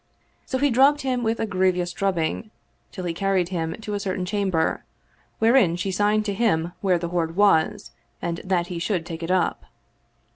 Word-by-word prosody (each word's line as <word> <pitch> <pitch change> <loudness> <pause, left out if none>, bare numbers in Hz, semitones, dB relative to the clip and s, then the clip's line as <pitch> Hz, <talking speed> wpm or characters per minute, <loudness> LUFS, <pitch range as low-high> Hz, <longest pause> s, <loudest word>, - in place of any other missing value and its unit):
So 260 - -1
he 285 +1 +2
drubbed 275 +4 +4
him 255 -2 -1
with 225 0 -1
a - - 0
grievous 185 -3 0
drubbing, 195 +2 -1 0.4
till 185 -3 -6
he 170 - -1
carried 190 0 0
him 165 -3 -2
to 210 -1 -5
a 205 - -1
certain 185 -2 -2
cham 200 +1 -1
ber, 160 -3 0 0.5
wherein 225 -6 +4
she 185 +2 -2
signed 210 +2 +1
to 205 - -1
him 175 -6 +1
that 180 -3 +2
the 170 - -3
hoard 165 -2 -1
was 200 -5 +2 0.3
and 170 -1 -3
that 185 -3 0
he 175 -1 -5
should 170 -1 -1
take 165 -1 -7
it 165 - -4
up. 185 -2 0
185 Hz, 190 wpm, -24 LUFS, 170-210 Hz, 0.5 s, drubbed